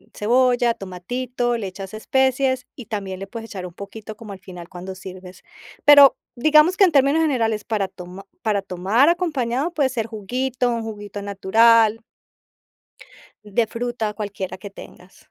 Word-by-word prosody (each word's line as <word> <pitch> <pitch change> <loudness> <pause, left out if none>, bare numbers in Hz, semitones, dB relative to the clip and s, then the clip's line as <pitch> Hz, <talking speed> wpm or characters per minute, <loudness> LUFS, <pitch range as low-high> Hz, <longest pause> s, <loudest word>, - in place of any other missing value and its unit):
cebolla, 245 +1 +2
tomatito, 240 +6 -3
le 200 -4 -4
echas 195 +1 -8
especies, 260 +2 +1
y 250 - -10
también 195 -3 -5
le 195 - -7
puedes 225 +1 -8
echar 185 -3 -6
un 175 - -9
poquito 215 +2 -9
como 215 -2 -10
al 190 - -9
final 175 -2 -11
cuando 185 +1 -8
sirves. 185 -1 -11 0.4
Pero 285 -2 +8 0.2
digamos 310 +6 +5
que 390 - +7
en 340 - +1
términos 280 +3 +4
generales 225 -8 0
para 210 -5 -1
toma 185 +1 -11 0.2
para 210 -3 0
tomar 195 - +2
acompañado 300 -4 0
puede 280 -3 +1
ser 230 -3 -3
juguito, 245 +4 -2
un 230 -1 -2
juguito 205 -2 -7
natural 220 +3 +4 1.4
de 210 +3 0
fruta, 230 -2 -3
cualquiera 200 -3 -5
que 200 +2 -9
tengas. 185 -1 -14
225 Hz, 155 wpm, -22 LUFS, 195-255 Hz, 1.4 s, Pero